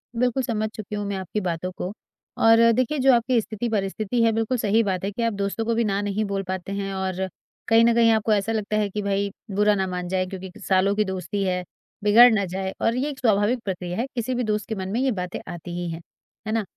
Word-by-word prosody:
बिल्कुल, 250 +2 +1
समझ 215 -3 -1
चुकी 215 -1 -6
हूँ 205 0 -3
मैं 200 - -2
आपकी 190 +3 -3
बातों 180 0 -3
को, 185 0 -5 0.5
और 225 +1 +6
देखिए, 255 +5 +1
जो 265 0 +5
आपकी 240 +1 +3
स्थिति-परिस्थिति 215 0 -2
है, 225 - +4
बिल्कुल 225 +3 0
सही 220 0 +2
बात 190 -3 -2
है 200 - -1
कि 235 - -5
आप 230 - +1
दोस्तों 200 +3 -2
को 230 0 0
भी 235 - +2
ना 200 -2 0
नहीं 205 +1 -1
बोल 195 -1 -2
पाते 185 0 -4
हैं 195 -1 -3
और 190 0 -2 0.4
कहीं 225 0 +6
न 235 - +4
कहीं, 230 -1 +5
आपको 220 0 +2
ऐसा 205 +1 0
लगता 215 -1 -1
है 210 -1 +1
कि, 210 +2 -3
"भई, 200 0 -1 0.2
बुरा 210 +1 +3
ना 190 -1 0
मान 180 -1 -4
जाए 185 +1 0
क्योंकि 185 0 -8 0.2
सालों 190 +1 +3
की 215 - +2
दोस्ती 190 +1 -3
है, 180 -1 -1 0.4
बिगड़ 225 +4 +8
ना 200 -2 +1
जाए।" 190 +1 -3
और 230 - +2
ये 265 +4 -1
एक 280 - -7
स्वाभाविक 220 +1 +2
प्रक्रिया 180 -2 -4
है, 235 - 0
किसी 245 +1 -1
भी 245 - 0
दोस्त 210 -1 -1
के 220 - -2
मन 190 -1 -4
में 225 +5 -1
ये 265 -1 +2
बातें 180 -3 -4
आती 175 +1 -8
ही 175 -1 -3
हैं। 165 +1 -6 0.5
है - - -1
ना? 225 -1 +1
205 Hz, 245 wpm, -24 LUFS, 190-225 Hz, 0.5 s, बिगड़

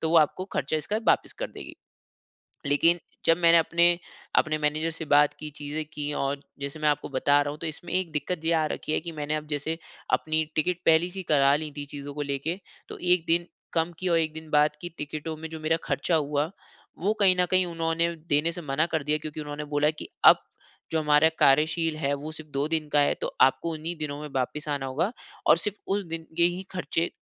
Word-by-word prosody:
तो 160 - -1
वो 170 - +4
आपको 155 +4 +2
खर्चा 150 +3 0
इसका 180 +7 -2
वापिस - - +3
कर - - -4
देगी। - - -9 0.9
लेकिन 165 +4 +4 0.3
जब 165 +1 +5
मैंने 170 -1 +6
अपने 170 +1 +4 0.5
अपने 155 0 +3
मैनेजर 155 +2 0
से 160 0 -5
बात 145 0 +4
की, 155 -1 -5
चीजें 150 +1 -5
की 150 0 -3
और, 140 0 -1 0.2
जैसे 140 +2 -5
मैं 150 - +3
आपको 145 -1 -1
बता 145 +2 +3
रहा 145 - -2
हूँ 150 - -8
तो 165 - -3
इसमें 165 +3 -6
एक 185 -3 0
दिक्कत 160 +3 -2
जे 165 - 0
आ 160 -1 +2
रखी - - -5
है - - +2
कि 170 0 -6
मैंने 150 0 -3
अब 155 0 -5
जैसे, 150 +2 -2 0.4
अपनी 155 0 +2
टिकट 170 +3 +1
पहले 165 +2 +4
से 190 +2 -6
ही 190 - -4
करा 140 -1 +5
लीं 155 0 -3
थीं 145 - -4
चीज़ों 145 0 -6
को 150 - -4
लेके, 145 +5 -2 0.3
तो - - -7
1 180 -2 +3
दिन 170 +1 +3 0.3
कम 165 +1 +1
की 185 - -2
और 170 - +4
1 155 -1 -1
दिन 160 0 -9
बाद 150 0 +4
की 175 - -5
टिकटों 155 +2 -5
में 160 0 -7
जो 160 - -7
मेरा 155 +1 +1
खर्चा 175 - 0
हुआ, 150 0 0 0.5
वो 200 +5 +1
कहीं 185 -2 +6
न 180 - +4
कहीं 185 0 +4
उन्होंने 165 0 -1 0.2
देने 150 +3 +3
से 175 +1 -6
मना 150 +2 0
कर 155 - 0
दिया 150 +1 +1
क्योंकि 155 0 -6
उन्होंने 150 0 -5
बोला 145 +1 +4
कि 155 - -9 0.2
अब, - - +10 0.5
जो 160 - +2
हमारा 150 +1 +4
कार्यशील 155 +3 +3
है, 140 -2 0
वो 145 +2 -5
सिर्फ़ 155 -1 -10
2 140 +2 0
दिन 160 -2 -1
का 145 - +3
है 145 - +3
तो - - -3
आपको 150 +5 +4
उन्ही 160 +2 -4
दिनों 150 -2 -4
में 150 - -5
वापस 150 +4 -2
आना 140 -2 -1
होगा 155 - -1 0.4
और - - +7
सिर्फ 210 -1 -2
उस 200 +1 0
दिन 165 0 -5
के 170 - +4
ही 175 +2 +1
खर्चे, 175 -2 -1
155 Hz, 230 wpm, -27 LUFS, 150-165 Hz, 0.9 s, अब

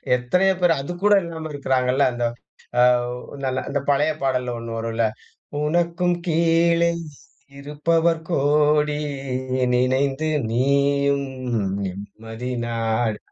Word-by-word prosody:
எத்தனையோ 180 +11 +2
பேர், 175 -2 +5
அதுக்கூட 175 +8 +1
இல்லாம 160 -2 -6
இருக்கிறாங்கல்ல. 130 -1 +1
அந்த 120 0 -3 0.6
அவ் 125 0 +4 0.3
நல்ல 130 -1 0
அந்த 140 0 0
பழைய 145 +2 +3
பாடல்ல 125 -2 0
1 115 0 -7
வரும் 115 0 -3
இல்ல 115 0 +2 0.6
உனக்கும் 175 +2 +1
கீழே 170 +1 +3 0.7
இருப்பவர் 165 +3 +1
கோடி. 150 -1 +2 0.8
நினைந்து 135 +4 +1 0.2
நீயும் 140 +2 +2 0.6
நிம்மதி 110 +5 -7 0.2
நாடு. 115 -1 -1
140 Hz, 100 wpm, -22 LUFS, 125-165 Hz, 0.8 s, பேர்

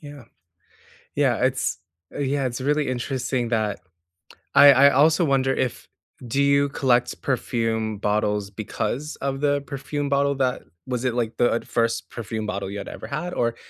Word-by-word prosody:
Yeah. 145 -4 -11 0.9
Yeah, - - +2
it's - - 0 0.3
uh, - - -6
yeah, 140 -1 0
it's 125 +1 -3
really 150 +1 +1
interesting 125 -1 -2
that 110 -3 -1 0.8
I 145 -1 +9
I 140 +2 +6
also 155 +5 +4
wonder 135 -2 +2
if 130 -2 -3 0.4
do 135 +4 +1
you 140 0 +3
collect 125 -3 +1
perfume 115 -4 -1
bottles 105 -1 0
because 110 +7 -4
of 135 0 -3
the 145 -1 +2
perfume 140 +1 -4
bottle 140 0 +2
that 130 -2 0 0.3
was 125 -1 -2
it, 125 -2 0
like, 115 -2 -2
the 120 -1 +2
1st 115 0 -1
perfume 110 -1 -5
bottle 100 -1 -4
you 100 - -5
had - - -6
ever - - -8
had, 175 +3 -4
or 115 -1 0
130 Hz, 160 wpm, -23 LUFS, 115-140 Hz, 0.9 s, I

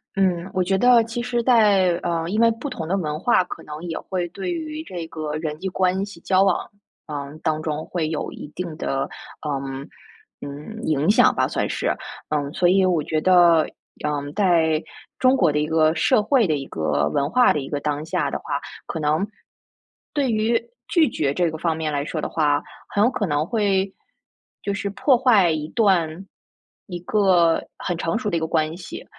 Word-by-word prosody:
嗯， 185 -2 +1
我 185 - +1
觉 190 +2 +1
得 245 +2 +6
其 230 +1 -4
实 240 -1 -1
在 210 -6 +5
呃， 165 -1 -1
因 215 +4 +1
为 230 - +6
不 250 +6 -5
同 165 -11 -5
的 190 +4 0
文 150 -4 -2
化 190 0 +3
可 180 - -8
能 150 0 -8
也 165 -2 -4
会 180 -2 -3
对 195 - -4
于 315 -2 -4
这 175 - -6
个 155 -2 -5
人 155 -1 -4
际 190 - -3
关 185 +1 +1
系 200 - -12
交 190 0 +3
往， 195 - +3 0.5
嗯， 145 0 -6
当 155 -1 0
中 155 -1 -3
会 165 -3 -2
有 155 - -3
一 - - -8
定 175 -3 -5
的， 135 -3 -1 0.4
嗯， 135 -1 -4 0.5
嗯， 150 +11 -8
影 155 +1 +1
响 210 - +5
吧， - - +2
算 - - -2
是， - - -1 0.3
嗯， 145 -2 -1
所 180 - +2
以 190 +2 +4
我 175 -4 +2
觉 155 +1 -1
得， 175 -3 +5 0.4
嗯， 145 -1 -3
在 165 -5 +3 0.4
中 255 +1 +5
国 170 -9 +3
的 150 - 0
一 150 - 0
个 160 0 +3
社 210 +5 +3
会 235 -1 +3
的 155 - +1
一 135 - -5
个 75 -2 0
文 140 +1 +1
化 250 +8 +4
的 150 - -1
一 135 - -6
个 145 - -2
当 150 +1 -2
下 160 - -1
的 - - -3
话， - - -3 0.3
可 - - -4
能， 155 +6 +1 0.9
对 280 -4 +1
于 225 +1 +2 0.3
拒 330 -4 +3
绝 145 - -1
这 170 +2 +1
个 160 - -7
方 165 -1 0
面 155 -2 -2
来 140 0 0
说 155 +2 -4
的 - - -2
话， 145 -2 +1 0.3
很 205 - +2
有 240 - +4
可 205 -6 -1
能 145 -1 0
会， 195 -2 0 0.7
就 200 - -1
是 200 0 -3
破 255 +5 +3
坏 230 -9 +4
一 155 -1 -2
段 185 -5 +1 0.6
一 180 -3 -5
个 180 -4 +3
很 175 - -3
成 165 +2 0
熟 215 -3 -2
的 170 - +1
一 - - 0
个 160 - -2
关 160 0 0
系。 175 -1 -9
175 Hz, 220 characters per minute, -23 LUFS, 155-205 Hz, 0.9 s, 得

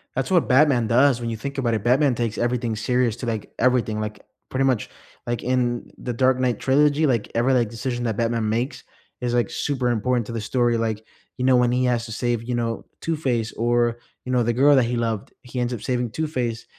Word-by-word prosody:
That's 135 +6 -2
what 175 -3 +3
Batman 130 -4 +4
does 125 +2 +4
when 120 -1 -3
you 115 - -3
think 140 +5 -6
about 120 -4 0
it, 110 -2 -1
Batman 130 +2 +3
takes 115 -2 -2
everything 120 -1 -1
serious 120 +1 +1
to, 125 - -6
like, 110 -3 -4
everything, 120 -4 +2
like, 105 0 -6 0.2
pretty 135 +1 0
much 130 -5 0 0.4
like, 120 -1 -3
in 125 -1 -1
the 125 - -4
Dark 130 +2 +2
Knight 125 -3 +1
trilogy, 145 +4 +3
like, 120 -7 0
every, 120 +3 +2
like, 120 -3 +3
decision 120 +2 -4
that 110 -2 -1
Batman 115 0 0
makes 120 +6 -2 0.3
is, 120 -1 -2
like, 120 -1 +1
super 130 -4 -1
important 120 +1 0
to 115 - -7
the 115 - -3
story, 120 +2 +1
like, 110 -1 -2 0.3
you 125 - -3
know, 130 -1 +5
when 125 -1 +3
he 125 +1 +1
has 120 -2 +1
to 115 - -7
save, 120 -1 -1
you 120 +1 -2
know, 115 -1 -2 0.2
Two-Face 130 -9 -1
or, 120 0 +1 0.2
you 125 - -5
know, 125 -1 +3
the 120 0 +1
girl 140 +4 +5
that 130 -3 +4
he 120 +1 -2
loved 115 -3 -2
he 125 0 -6
ends 120 0 -1
up 115 - -5
saving 125 -3 -1
Two-Face, 125 -7 -3
120 Hz, 225 wpm, -23 LUFS, 115-130 Hz, 0.4 s, know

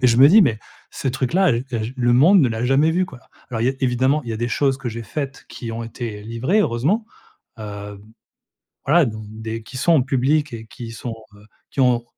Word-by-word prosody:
et - - +6
je 115 -1 +4
me 140 +2 +9
dis: 215 +6 +7
«Mais, 110 -9 +1 0.3
ce 135 - -3
truc-là, 135 +7 +2
heu, 120 +3 -1
je 115 0 -3
le 120 -1 +2
monde 175 +9 +6
ne 130 - +3
l'a 115 +1 -2
jamais 140 +5 +3
vu!», 185 +2 +2
quoi. 130 -7 -13 0.3
Alors, 115 -2 -3
il - - +2
y - - +4
a - - -6
évidemment, 130 +4 +2
il 115 - -5
y - - -2
a - - -4
des 120 +1 -1
choses 135 +1 +1
que 125 -3 -4
j'ai 115 +1 -6
faites 135 +5 -5
qui 115 -2 -6
ont 115 +1 -4
été 115 -2 -6
livrées, 120 - 0
heureusement, 160 - +1 0.5
heu, 105 -1 -7 0.9
voilà, 155 +2 +5
donc 110 -2 -5
des 110 +1 -6
qui 130 +4 -9
sont 170 +6 +2
en 145 - +5
publiques 135 +3 +1
et 110 -1 -7
qui 115 0 -9
sont, 115 0 -6 0.2
heu, 105 +1 -18 0.3
qui - - -6
ont 120 -2 +3
125 Hz, 235 wpm, -21 LUFS, 115-140 Hz, 0.9 s, me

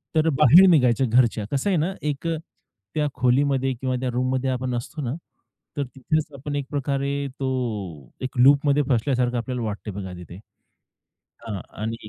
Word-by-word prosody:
तर 160 +1 +3
बाहेर 160 +6 +7
निघायच्या 130 -6 +4
घरच्या. 115 -2 +2
कसं 140 +8 0
आहे 190 - +2
ना, 165 +5 0
एक 150 +1 -3
अ, 165 -1 0 0.6
त्या 150 -1 +1
खोलीमध्ये 135 +1 +2
किंवा 130 +1 -2
त्या 130 - -1
रूममध्ये 130 +1 0
आपण 130 -1 -2
असतो 120 +6 -5
ना, 125 -3 -2 0.6
तर 145 - +1
तिथेच 145 +4 -2
आपण 145 +2 -5
एक 140 -1 -2
प्रकारे 140 0 -1
तो 135 - -1 0.7
एक 130 0 -5
लूपमध्ये 140 +2 +5
फसल्यासारखं 125 0 +1
आपल्याला 125 +1 -3
वाटतंय 105 -1 -5
बघा 95 -2 -6
तिथे. 85 -1 -10 1.1
हां 105 -4 -4 0.2
आणि 110 0 -5
130 Hz, 160 wpm, -24 LUFS, 120-145 Hz, 1.1 s, बाहेर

